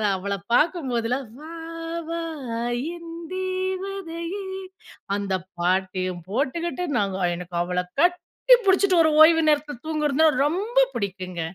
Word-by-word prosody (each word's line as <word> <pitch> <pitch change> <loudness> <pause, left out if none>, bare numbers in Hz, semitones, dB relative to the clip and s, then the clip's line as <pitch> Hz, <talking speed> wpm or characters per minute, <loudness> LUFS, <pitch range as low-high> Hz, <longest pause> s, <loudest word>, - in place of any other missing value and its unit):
அவள 200 +2 -3 0.2
பார்க்கும்போதெல்லாம் 255 -6 +1
"வா 315 +2 -10 0.6
வா 335 0 -2 0.8
என்தேவதையே" 370 +1 -4 0.7
அந்த 200 -1 -2 0.3
பாட்டையும் 185 -1 0
போட்டுக்கிட்டு. 335 +8 -1
நாங்க 195 -2 0
எனக்கு 180 0 -8
அவள 180 +1 -1 0.2
கட்டி 360 +8 +4
புடிச்சுட்டு 380 -2 +5
ஒரு 315 - +3
ஓய்வு 325 0 +6
நேரத்தில 295 -2 0
தூங்குறதுனா 305 0 +2 0.2
ரொம்ப 400 +10 -2 0.2
புடிக்குங்க. 185 -4 -4
315 Hz, 100 wpm, -24 LUFS, -, 0.8 s, ஓய்வு